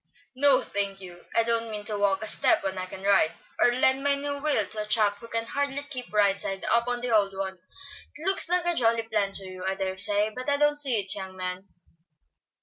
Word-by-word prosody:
"No, 270 0 +3
thank 200 -1 -4
you. 175 -2 -13
I 230 - +3
don't 230 0 -2
mean 210 -1 -6
to 210 - +1
walk 200 0 0
a - - -5
step - - +3
when 190 -1 -3
I 185 0 -5
can 190 +1 -10
ride; 195 -5 +2 0.3
or 245 - +4
lend 260 +2 +2
my 285 0 +2
new 285 0 -4
wheel 285 -8 0
to 215 +2 0
a 210 - -6
chap 210 -1 +1
who 230 - -11
can 230 0 -3
hardly 285 +3 -3
keep 260 -4 -8
right 200 -2 +2
side 195 0 -4
up 235 +1 +2
on 245 0 -3
the 245 -2 0
old 200 -2 +1
one. 190 -1 -5 0.6
It 305 - -9
looks 385 -3 +5
like 360 -1 +1
a 345 - +3
jolly 230 -6 +2
plan 210 -3 -2
to 195 - +4
you, 185 -1 -9
I 190 +1 -2
dare 190 -1 -4
say, 205 +2 +4
but 255 +5 -5
I 285 - +3
don't 295 0 +2
see 265 -6 +5
it, 195 -1 +1
young 190 -2 -7
man." 185 +1 -6
215 Hz, 240 wpm, -26 LUFS, 195-260 Hz, 0.6 s, looks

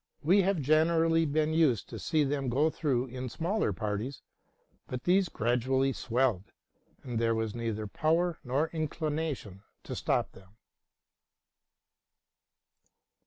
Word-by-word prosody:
We 185 +7 +5
had 190 -5 0
generally 165 +2 +3
been 155 +2 +1
used 155 -9 +2
to - - -7
see 155 -2 +1
them 140 -2 -1
go 145 +6 +2
through 130 -7 0
in 130 0 -6
small 175 - -1
parties; 105 +6 -4 0.6
but 125 0 -5
these 185 +1 +3
gradually 130 +4 +1
swelled, 120 -7 -1 0.5
and 120 -3 -3
there 115 0 +2
was 110 -1 -2
neither 115 -2 -3
power 165 - 0
nor 140 +6 0
inclination 155 - -3 0.2
to - - -6
stop - - 0
them. 95 +2 -18
135 Hz, 120 wpm, -30 LUFS, 120-160 Hz, 0.6 s, We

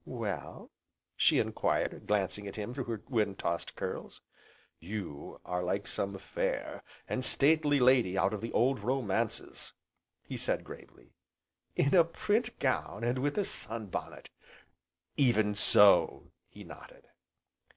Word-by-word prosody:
"Well?" 105 - -5 0.4
she - - +4
enquired, - - 0
glancing 100 0 0
at 100 - -7
him 105 +2 -5
through 130 -1 -4
her 115 -3 -4
wind 105 -6 0
tossed 85 0 -3
curls. - - -5 0.6
"You 90 -5 -7
are 90 0 -2
like 95 +3 -1
some 100 0 -3
fair, - - -3 0.3
and 130 - -2
stately 145 +1 +3
lady 125 -7 +4
out 95 +2 +2
of 105 - -4
the 115 - -4
old 130 +1 +2
romances," 115 -1 -2 0.5
he - - -6
said - - -1
gravely. - - -13 0.6
"In 140 - +2
a 175 -3 +8
print 215 +8 -1
gown, 130 -4 -1
and 120 +2 0
with 145 +5 -1
a 205 - +2
sun 110 - -6
bonnet!" - - -6 0.9
"Even 110 -6 +3
so!" 105 0 +5 0.2
he - - -12
nodded. - - -13
110 Hz, 135 wpm, -31 LUFS, 100-130 Hz, 0.9 s, a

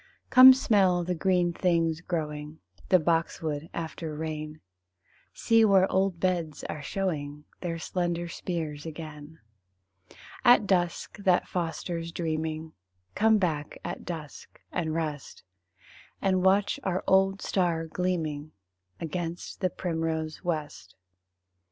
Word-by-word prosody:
Come 255 +1 +11
smell 195 -8 +3
the 180 +1 -1
green 180 0 +1
things 165 -3 +1
growing, 150 -3 -4 0.3
The 185 - +7
boxwood 165 -2 -1
after 160 -1 -5
rain; 155 0 -5 0.7
See 225 -1 +3
where 195 -3 +5
old 190 -2 +1
beds 170 -5 -1
are 155 - -5
showing 150 -4 -3 0.2
Their 170 -2 -3
slender 175 0 -2
spears 165 -3 -4
again. 155 -1 -9 1.1
At 240 -3 +6
dusk, 180 +1 0
that 185 -3 +2
fosters 170 -1 -3
dreaming 160 -1 -3 0.4
Come 220 +1 +4
back 155 -6 -2
at - - -5
dusk 160 -4 -8
and 160 -3 -2
rest, 155 -4 -4 0.8
And 185 -1 +1
watch 195 +2 +3
our 185 -1 -1
old 195 +1 +3
star 170 -4 0
gleaming 160 -4 -2 0.5
Against 170 +1 -5
the 185 - +2
primrose 160 -3 -3
west. 155 -4 -4
170 Hz, 115 wpm, -28 LUFS, 155-185 Hz, 1.1 s, Come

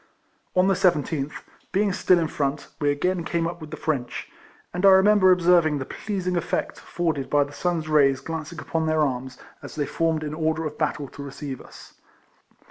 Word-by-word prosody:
On 185 +1 +4
the 195 - +4
17th, 150 -5 +1 0.4
being 200 0 +1
still 185 0 +4
in 165 -2 +1
front, 145 -1 -2
we 145 -2 +2
again 175 +5 0
came 170 0 -1
up 170 0 -4
with 155 - -8
the 155 - -7
French, 135 -6 -3 0.4
and^ 180 +1 -3
I 195 - +8
remember 190 0 +6
observing 170 -4 +4
the 135 - -4
pleasing 185 -1 -3
effect 175 - -2
afforded 160 -6 -2
by 145 -1 +4
the 145 +1 -10
sun's 170 -2 -1
rays 140 -3 +4
glancing 160 +3 -6
upon 160 +1 -2
their 155 0 +2
arms, 130 -2 -3 0.2
as - - -9
they 150 -2 -1
formed 160 +1 0
in 150 -1 -4
order 160 0 -1
of 150 -1 -6
battle 150 -2 -1
to - - -10
receive 140 -1 -6
us. - - -14
160 Hz, 190 wpm, -24 LUFS, 145-175 Hz, 0.4 s, I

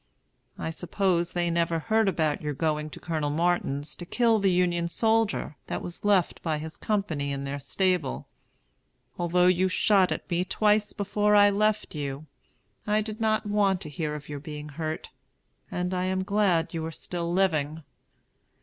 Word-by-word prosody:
I 160 - -3
suppose 175 0 0
they 175 -1 0
never 170 0 +1
heard 220 +5 +2
about 155 -5 0
your 150 -1 -3
going 150 0 -1
to - - -10
Colonel 155 -4 -2
Martin's 150 -3 0
to - - -7
kill 225 +4 +2
the 195 -1 +3
Union 175 -1 +1
soldier 220 -4 +1
that - - -3
was 175 - -7
left 200 -4 +2
by 160 -2 -1
his 155 +1 -6
company 160 -10 -1
in 140 0 -3
their 140 +1 -4
stable. 180 0 0 0.9
Although 175 +1 +3
you 185 +1 +3
shot 190 0 +3
at - - -3
me 175 -1 0
twice 210 +2 +2
before 210 +1 +1
I 205 0 +7
left 215 +1 +1
you, 145 -1 -4 0.6
I 210 +1 +3
did 215 +1 -5
not 215 0 +1
want 205 -2 +2
to 155 - -6
hear 150 0 -3
of 150 -1 -8
your 145 -1 -5
being 150 +1 -7
hurt, 155 +1 -5 0.6
and 180 +1 -2
am 185 +1 0
glad 195 -5 +1
you 165 -1 -3
are - - -5
still 170 +1 -4
living. 160 -4 +1
175 Hz, 170 wpm, -27 LUFS, 155-200 Hz, 0.9 s, I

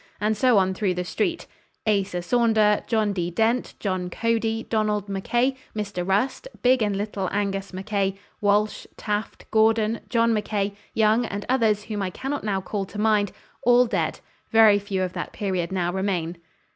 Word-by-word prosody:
And 210 +2 +1
so 250 0 +4
on 190 -1 +3
through 185 -1 0
the 180 - -2
street. 335 - -2 0.4
Asa 195 -4 0
Saunder, 220 0 +3
John 215 -2 +1
D. 175 -3 -1
Dent, 225 +7 0
John 185 -3 -2
Cody, 225 +2 0
Donald 210 -2 0
Mackay, 240 +7 0 0.2
Mr. 200 -4 -3
Rust, 210 - 0 0.2
big 255 0 +4
and 205 -2 +1
little 200 -2 -2
Angus 200 -1 -2
Mackay, 195 0 -1 0.3
Walsh, 210 +1 +1
Taft, 210 0 -3
Gordon, 220 0 +3
John 230 +1 +3
Mackay, 205 -1 -1 0.2
Young 220 +2 +3
and 200 0 -5
others 225 -5 +2
whom 210 -1 -4
I 190 - -1
cannot 270 +9 -4
now 195 -3 -1
call 195 +1 -3
to 205 - -10
mind, 210 -2 +2 0.3
all 245 +1 +5
dead; 230 - -1 0.3
very 220 -3 +6
few 195 -2 -2
of 180 -1 -3
that - - -5
period 185 -4 -2
now 175 -2 -1
remain. 180 -3 -2
210 Hz, 165 wpm, -24 LUFS, 195-225 Hz, 0.4 s, very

